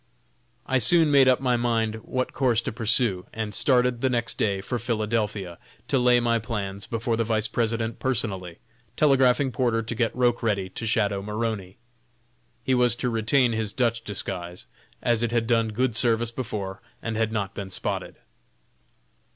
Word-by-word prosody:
I 130 -1 +1
soon 165 +2 +5
made 140 -2 +6
up 130 -1 +4
my 125 -2 +1
mind 115 -2 0
what 130 +3 -3
course 125 -4 +2
to - - -3
pursue, 110 -4 0
and 110 -2 -4
started 125 0 +2
the 130 - +2
next 120 -2 -1
day 100 -2 +1
for 120 +5 -3
Philadelphia, 110 -5 -2 0.3
to 135 - +2
lay 125 0 +5
my 115 -1 +1
plans 100 -3 -4
before 115 0 -1
the 115 - 0
Vice 110 -1 0
President 115 0 -1
personally; 95 -9 -2 0.4
telegraphing 135 -2 +3
Porter 120 -3 0
to 115 - -4
get 115 0 -1
Roch 120 -1 +2
ready 100 -4 0
to 115 - -5
shadow 100 -3 +1
Maroney. 105 -2 -4 0.9
He 130 - +1
was 125 -2 +4
to 125 0 -2
retain 115 +3 +2
his 110 -2 -2
Dutch 115 -2 0
disguise, 90 -4 -5 0.4
as 120 -2 +2
it 120 -1 0
had 115 -1 +1
done 115 -1 +2
good 115 +2 -1
service 115 -1 +2
before, 105 -5 -5 0.2
and 115 -1 -3
had 110 0 0
not 100 -3 -2
been 100 -1 -6
"spotted." 95 - -4
115 Hz, 165 wpm, -25 LUFS, 105-125 Hz, 0.9 s, made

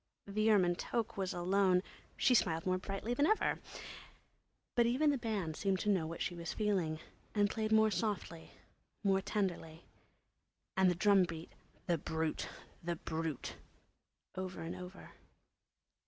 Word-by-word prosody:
The 215 +2 +1
ermine 185 -5 +5
toque 230 +2 -2
was 190 -2 -1
alone; 185 +1 +3 0.3
she 255 - +4
smiled 165 -8 +2
more 185 0 +1
brightly 195 +5 -3
than 285 +5 +3
ever. 435 - +2 1.1
But 235 -1 +4
even 285 +5 +3
the 280 - +1
band 205 -9 -2
seemed 195 +1 +1
to 210 - 0
know 175 -5 +1
what 165 +1 -3
she - - -2
was 170 -1 -4
feeling 185 -7 0 0.4
and 205 0 +3
played 220 -1 -1
more 220 0 +5
softly, 180 -4 -2 0.6
played 195 -1 +3
tenderly, 175 -5 -2 0.9
and 190 -2 +5
the 180 - +1
drum 195 0 +5
beat, 165 -1 -7 0.3
"The 170 -2 +1
Brute! 160 +1 -2 0.3
The 170 0 -2
Brute!" 160 -3 -4 0.8
over 185 0 -4
and 165 - -4
over. 180 +1 -9
190 Hz, 145 wpm, -35 LUFS, 170-210 Hz, 1.1 s, ermine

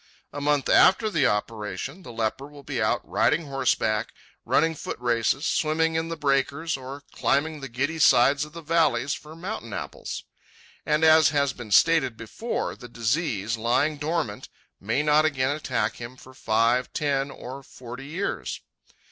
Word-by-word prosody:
A 145 - -5
month 145 -1 +1
after 215 +3 +5
the 155 -8 +3
operation 110 - -3
the 125 - -10
leper 115 +4 -2
will 145 -1 -14
be 130 -3 -3
out 110 +3 0
riding 160 +1 +2
horseback, 125 -5 0 0.4
running 165 +1 +2
foot 155 - -6
races, 120 +4 +1
swimming 160 +1 +1
in 160 0 -1
the 165 - -4
breakers, 140 +3 0
or 135 +2 -8
climbing 150 +3 0
the 135 -1 -7
giddy 140 +7 -2
sides 140 0 +5
of 150 0 -9
the 170 0 -9
valleys 150 -5 +2
for 155 +1 -9
mountain 175 - -6
apples. - - -6 0.6
And 150 +1 +2
as 160 -1 +7
has 140 -2 +1
been 120 -4 -9
stated 135 +1 +4
before, 170 - -4
the 125 - -12
disease, 115 - -1
lying 125 +7 +1
dormant, 150 -7 -3 0.3
may 115 +9 0
not 150 0 +4
again 145 -2 +1
attack 120 -7 -2
him 120 +2 -8
for 130 +1 -15
five, 115 +1 +1
ten, 140 -2 0
or 135 0 -8
forty 125 0 -10
years. 180 +7 -3
140 Hz, 160 wpm, -25 LUFS, 120-155 Hz, 0.6 s, as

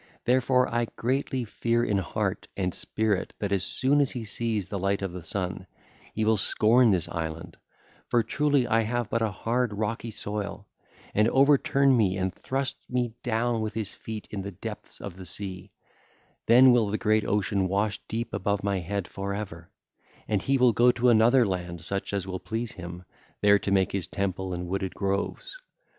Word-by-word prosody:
Therefore, 125 0 +3
I 120 0 0
greatly 130 0 -1
fear 115 +2 0
in 105 -4 +1
heart 90 - -2
and 90 -2 -1
spirit 105 -3 -1
that 100 -2 -3
as 95 -2 +2
soon 135 - +2
as 140 - +2
he 120 - -5
sets 110 -2 -1
the 100 +1 -4
light 100 +1 0
of 95 - -2
the 90 -1 -8
sun, 95 0 -3 0.5
he 110 - 0
will 110 0 +3
scorn 115 +4 +4
this 90 -5 +2
island—for 85 +7 -4
truly 145 +3 +2
I 115 -1 +2
have 120 +1 -2
but 115 - +1
a 110 - +2
hard, 115 +4 -1
rocky 110 +2 -3
soil—and 105 0 -4
overturn 140 0 +4
me 100 -5 +2
and 95 -1 -1
thrust 135 +5 -2
me 125 -2 -1
down 115 0 0
with 110 -1 -3
his 110 -3 -3
feet 110 -2 -7
in 100 - -3
the 100 - -5
depths 95 - -8
of 95 -3 -7
the 95 - -9
sea; 95 +1 -4 0.8
then 125 +3 +8
will 115 -4 +3
the 105 - 0
great 110 0 +2
ocean 100 -1 0
wash 100 +2 0
deep 115 +1 -4
above 100 +2 -1
my 100 -1 0
head 95 +1 -3
for 100 0 -4
ever, 85 -5 -7 0.6
and 105 -3 +1
he 135 0 +2
will 125 -2 +5
go 120 +4 +5
to 125 +1 +3
another 120 +2 +5
land 90 -3 -4
such 100 +2 -2
as 100 -2 -2
will 95 -1 -4
please 115 +3 -4
him, 90 -3 -8 0.4
there 100 0 +5
to - - -3
make 95 -1 +2
his 95 -3 -1
temple 95 -1 -2
and 90 0 -3
wooded 95 0 -3
groves. 100 - -2
105 Hz, 180 wpm, -27 LUFS, 95-120 Hz, 0.8 s, then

